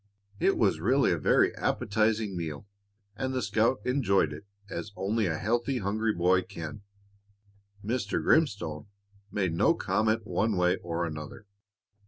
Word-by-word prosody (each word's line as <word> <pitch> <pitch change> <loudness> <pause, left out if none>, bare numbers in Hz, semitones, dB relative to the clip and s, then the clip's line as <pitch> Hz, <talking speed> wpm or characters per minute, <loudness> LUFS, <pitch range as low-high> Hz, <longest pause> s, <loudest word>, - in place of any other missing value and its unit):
It - - +2
was - - +2
really - - +3
a - - +1
very - - +3
appetizing 110 -1 0
meal, 80 0 -5 0.5
and 130 +3 -3
the 130 - 0
scout 115 +1 +1
enjoyed 100 - +2
it 80 +7 -11 0.2
as 85 -1 -6
only 105 +2 0
a 80 -2 -1
healthy, 120 - 0
hungry 110 +2 0
boy 90 0 +3
can. 80 +1 -8 1.0
Mr. 110 -2 -1
Grimstone 100 - +1 0.4
made 95 -5 0
no 85 - +3
comment 110 0 0
one 110 -2 0
way 90 0 +3
or 85 0 -3
another. 75 +5 -7
100 Hz, 140 wpm, -28 LUFS, 85-110 Hz, 1.0 s, really